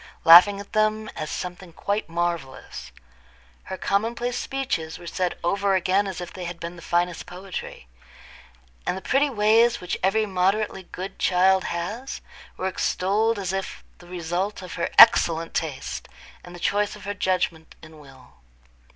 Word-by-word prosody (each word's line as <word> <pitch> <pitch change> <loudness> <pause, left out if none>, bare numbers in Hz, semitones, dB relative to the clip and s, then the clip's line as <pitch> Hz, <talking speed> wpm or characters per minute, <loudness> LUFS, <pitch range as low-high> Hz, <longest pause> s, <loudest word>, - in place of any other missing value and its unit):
laughing 180 +5 +8
at 200 - -11
them 215 0 +1
as 155 - -5
something 180 0 -6
quite 200 +4 -3
marvellous; 165 - -4 0.7
her 190 - -6
commonplace 235 +6 -1
speeches 250 - -3
were 175 - -13
said 180 +1 -2
over 195 +2 +1
again 190 +2 +1
as 190 -2 -5
if 175 -1 -7
they 185 -1 -6
had 170 0 -6
been 170 +1 -6
the 170 - -12
finest 175 +1 -1
poetry; 185 - -8 1.0
and 180 - 0
the - - -7
pretty 280 +2 +2
ways 230 0 +3
which 180 - -4
every 215 +3 +2
moderately 195 +1 0
good 190 +2 -7
child 190 +1 +3
has 205 +10 -4 0.4
were 185 - -2
extolled 205 +4 0
as 190 -2 -3
if 195 0 -4 0.2
the 175 - -15
result 180 +3 -3
of 180 - -8
her 170 - -2
excellent 165 -8 +7
taste, 150 -5 -4 0.4
and 175 0 -11
the - - -10
choice 205 +4 0
of 205 - -13
her 205 - -2
judgment 180 -4 -2
and 155 -1 -13
will. 135 - -17
185 Hz, 160 wpm, -24 LUFS, 175-205 Hz, 1.0 s, laughing